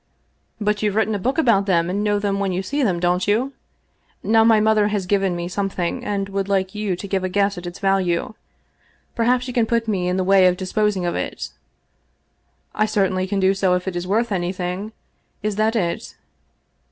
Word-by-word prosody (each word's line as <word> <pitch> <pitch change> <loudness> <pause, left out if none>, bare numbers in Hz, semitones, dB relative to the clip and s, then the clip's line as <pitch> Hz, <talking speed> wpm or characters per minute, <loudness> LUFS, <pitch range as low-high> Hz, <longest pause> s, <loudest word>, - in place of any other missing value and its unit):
" - - -45
But 210 -1 0
you've 210 -2 0
written 220 0 +1
a 205 - -1
book 260 - -1
about 230 -10 +3
them, 170 -3 +2
and 200 +3 -1
know 205 -1 +1
them 200 -1 -1
when 195 -1 0
you 185 +1 -2
see 285 +8 -2
them, 190 -9 +1
don't 180 +2 +1
you? 240 +7 +1 0.7
Now 225 +1 +4
my 225 -1 +5
mother 215 -1 +3
has 205 -3 -1
given 195 -1 +1
me 175 0 -3
something, 185 -2 -2
and 200 -1 -2
would 195 0 -2
like 190 -1 0
you 210 -3 -2
to 200 - -7
give 190 -1 -1
a 185 - -1
guess 200 +1 +1
at 175 -1 -7
its 175 - -7
value. 195 -2 0 0.8
Perhaps 245 +2 +1
you 250 - -5
can 235 -2 +2
put 230 0 0
me 190 -4 0
in 180 +1 0
the 190 - +1
way 190 0 +5
of 180 0 +2
disposing 195 0 0
of 175 - 0
it?" - - -4 0.6
" - - -45
I 215 - +4
certainly 190 -2 0
can 200 0 -1
do 190 0 +3
so 190 -2 +2
if 180 +1 -3
it 190 - -3
is 175 +1 -3
worth 225 +4 +1
anything. 185 +2 -3 0.5
Is 210 -1 -1
that 220 +2 +1
it 175 -6 -2
195 Hz, 215 wpm, -21 LUFS, 185-215 Hz, 0.8 s, my